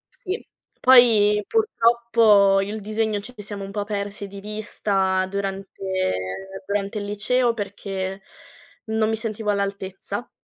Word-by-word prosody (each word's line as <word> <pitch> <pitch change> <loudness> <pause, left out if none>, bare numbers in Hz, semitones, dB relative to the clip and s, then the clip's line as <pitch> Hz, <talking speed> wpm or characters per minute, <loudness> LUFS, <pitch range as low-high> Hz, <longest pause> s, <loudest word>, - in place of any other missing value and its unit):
Sì, 385 +5 -5 0.3
poi 220 -5 +6
purtroppo, 230 - +4
io 195 +1 -2
e - - -4
il 220 - -6
disegno 215 0 -1
ci 245 +5 -10
siamo 205 -1 -6
un 195 - -7
po' 205 0 -2
persi 200 -1 -4
di 200 0 -10
vista 200 -3 0
durante 195 0 -5 0.9
durante 200 +1 -1
il 205 - -5
liceo, 230 +4 +1
perché 195 -2 -4 0.6
non 220 0 +1
mi 225 - +1
sentivo 220 -1 -3
all'altezza. 200 +1 -3
205 Hz, 130 wpm, -23 LUFS, 200-220 Hz, 0.9 s, poi